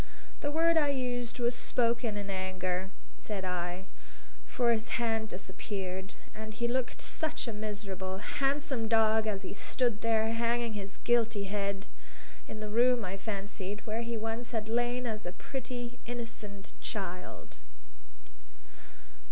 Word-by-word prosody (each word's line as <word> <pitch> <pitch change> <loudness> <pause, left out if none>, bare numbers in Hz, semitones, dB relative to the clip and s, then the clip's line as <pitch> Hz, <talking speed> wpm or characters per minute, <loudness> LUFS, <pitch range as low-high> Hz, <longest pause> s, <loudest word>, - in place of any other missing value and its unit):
"The 290 - 0
word 330 +2 +5
I 295 -2 +5
used 245 -3 0
was 240 0 +3
spoken 235 -3 +2
in 200 -1 -3
anger," 185 -1 -1 0.3
said 200 -3 -3
I; 180 +1 -1 0.6
for 240 -1 +3
his 225 0 +1
had 225 -2 +1
disappeared; 190 -1 -4 0.2
and 215 0 -6
he 235 - +1
looked 250 +1 0
such 310 -4 -1
a 230 - -1
miserable, 200 -3 -3
handsome 270 - +1
dog 220 -1 +5
as 200 -2 0
he - - -4
stood 235 +1 +1
there 225 -1 +3
hanging 235 0 +2
his 200 -1 -4
guilty 230 -3 +4
head 200 0 -1 0.6
in 215 - -6
the 215 - -3
room, 240 +1 +5
I 185 +1 -2
fancied, 200 0 -3
where 220 +1 0
he 235 0 -2
once 225 +2 -2
had 220 -1 0
lain 240 +2 +2
as 215 -2 -2
a 175 - -3
pretty, 245 -1 -4
innocent 225 -4 -5
child. 185 -3 -4
220 Hz, 140 wpm, -33 LUFS, 200-240 Hz, 0.6 s, word